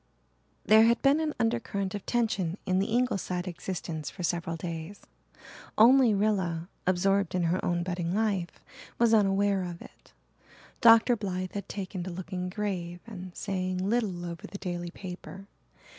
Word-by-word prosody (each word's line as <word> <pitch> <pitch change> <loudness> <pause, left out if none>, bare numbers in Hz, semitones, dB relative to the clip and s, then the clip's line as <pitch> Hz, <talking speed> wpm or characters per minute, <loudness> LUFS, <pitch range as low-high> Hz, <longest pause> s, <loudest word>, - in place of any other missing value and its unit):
There 220 +1 +7
had 235 +1 +3
been 280 +2 +5
an 310 -1 -1
undercurrent 225 -4 -1
of 205 -2 -6
tension 205 -7 0
in 185 0 +2
the 195 - +1
Ingleside 200 -6 -1
existence 170 -3 -5
for 180 - -8
several 170 -1 -1
days. 165 +3 -6 0.8
Only 240 0 +6
Rilla, 190 -5 0 0.2
absorbed 195 0 +2
in 180 - +1
her 170 +2 0
own 175 -1 0
budding 175 0 -2
life, 200 -5 -1 0.3
was 230 -1 +4
unaware 200 -2 +3
of 175 -1 -6
it. - - -16 0.7
Dr. 230 +1 +7
Blythe 185 -4 -3
had 200 - -5
taken 190 -2 -5
to 180 - -5
looking 180 0 -4
grave 180 -3 -3
and 185 -5 -9
saying 185 -2 -2
little 205 -6 0
over 170 -1 -7
the 200 - -8
daily 175 -2 -4
paper. 185 +1 -9
190 Hz, 150 wpm, -29 LUFS, 175-210 Hz, 0.8 s, There